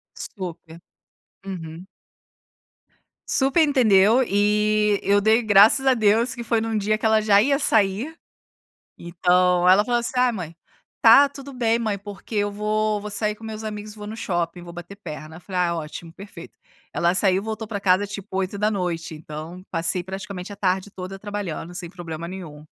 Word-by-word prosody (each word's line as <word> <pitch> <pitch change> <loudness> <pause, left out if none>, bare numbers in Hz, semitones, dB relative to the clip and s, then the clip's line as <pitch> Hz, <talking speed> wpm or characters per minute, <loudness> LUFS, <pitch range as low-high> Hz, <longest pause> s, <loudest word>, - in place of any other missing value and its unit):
Super. 170 -4 -7 0.7
Uhum. 170 -2 -7 1.4
Super 270 +4 +2
entendeu, 230 -3 +4
e 210 0 +2
eu 200 +1 +3
dei 220 +3 +3
graças 215 +5 +6
a 265 - +5
Deus 230 +2 +2
que 240 -2 -7
foi 230 -1 +1
em - - -2
um 225 -1 -1
dia 215 +1 +1
que 220 - -5
ela 220 0 +4
já 205 -1 +5
ia 275 +4 +2
sair, 225 +5 +1 0.8
então, 180 +1 +2
ela 190 +3 +6
falava, 240 0 +1
assim, 235 - -3
"Ai 250 -1 +3
mãe, 170 -6 -7 0.4
está 255 +5 +7
tudo 275 0 -10
bem 235 -3 +1
mãe, 220 -3 -1
porque 200 +2 -10
eu 205 0 +1
vou 210 +1 -1
vou 210 - -6
sair 210 0 -1
com 225 - -14
meus 220 0 -6
amigos 210 -1 -6
e - - -19
vou 210 -1 -8
no 220 - -7
shopping 175 -4 -2
vou 170 - -10
bater 175 +3 -10
perna", 155 -5 -9
eu - - -12
falei: 185 0 -3
"Ai 175 -1 +2
ótimo 165 0 -6
perfeito", 190 -2 -12 0.3
ela 175 +1 +1
saiu 190 0 +2
voltou 220 0 -5
para 205 -2 -4
casa 195 +1 +2
tipo 200 0 -8
20:00, 185 -4 -2
então, 155 +3 -9
passei 165 +1 0
praticamente 190 +1 -7
a - - -9
tarde 190 0 -1
toda 190 0 -7
trabalhando, 195 -4 -5
sem 175 -1 -6
problema 170 -2 -7
nenhum. 165 -5 -9
200 Hz, 175 wpm, -23 LUFS, 180-220 Hz, 1.4 s, está